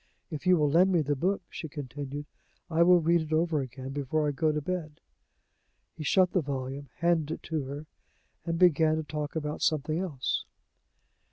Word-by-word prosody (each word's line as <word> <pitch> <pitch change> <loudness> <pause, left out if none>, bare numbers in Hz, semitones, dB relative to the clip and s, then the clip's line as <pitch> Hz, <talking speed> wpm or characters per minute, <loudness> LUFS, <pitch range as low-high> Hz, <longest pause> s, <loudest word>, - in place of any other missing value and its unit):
If 155 +3 -5
you 180 -1 +6
will 150 -2 +3
lend 180 +5 +5
me 175 -3 +3
the 145 0 0
book," 185 +8 0
she 160 - -7
continued, 145 0 -6 0.5
"I 160 +1 +2
will 175 +1 +7
read 170 +1 +3
it 160 0 -7
over 160 -1 +2
again 130 0 -7
before 145 +2 -1
I - - +1
go 155 +3 +1
to 150 - -1
bed." 155 -1 -4 1.0
He 155 - -6
shut 185 +4 +4
the 185 - +2
volume, 135 -1 -4
handed 170 -3 +2
it - - -16
to 155 -4 -2
her, 145 +3 -6 0.6
and 165 -1 -2
began 160 -3 +5
to 160 - -2
talk 150 +1 -4
about 150 -1 -3
something 155 +1 +1
else. 155 -9 -2
155 Hz, 185 wpm, -29 LUFS, 145-170 Hz, 1.0 s, will